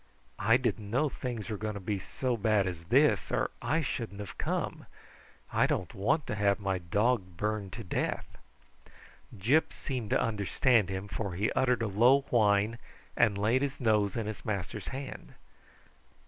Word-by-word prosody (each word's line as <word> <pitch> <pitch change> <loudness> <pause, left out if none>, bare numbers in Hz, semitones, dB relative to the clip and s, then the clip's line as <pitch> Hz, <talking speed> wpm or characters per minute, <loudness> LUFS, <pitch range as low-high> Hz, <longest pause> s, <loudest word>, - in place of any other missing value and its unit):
"I 115 +4 +5
didn't 110 -5 -2
know 135 +7 +2
things 120 -5 -5
were 110 -3 -3
going 110 0 -3
to - - -4
be 100 +1 -2
so 125 +6 -2
bad 105 -2 +2
as 85 -3 -5
this - - +3
or - - 0
I 160 +2 +1
shouldn't 110 -6 -4
have 100 -3 -7
come. - - -2 0.7
I - - +4
don't - - -2
want 130 +10 +1
to - - -3
have 100 -1 +2
my 95 -2 -1
dog 95 +1 0
burned 105 -2 -2
to 115 - -6
death." 90 - -2 1.1
Gyp 130 +12 +3
seemed 125 -6 -4
to - - +3
understand 110 0 +2
him, 95 +1 -4
for 100 -3 -4
he 100 +4 0
uttered 125 -2 +2
a - - 0
low 120 +8 +5
whine 105 0 +3 0.4
and 110 -4 +3
laid 110 +6 +2
his 140 -1 -2
nose 105 -5 +2
in 115 - -1
his 110 -1 -6
master's 100 -1 -4
hand. 135 0 -7
105 Hz, 170 wpm, -30 LUFS, 100-120 Hz, 1.1 s, I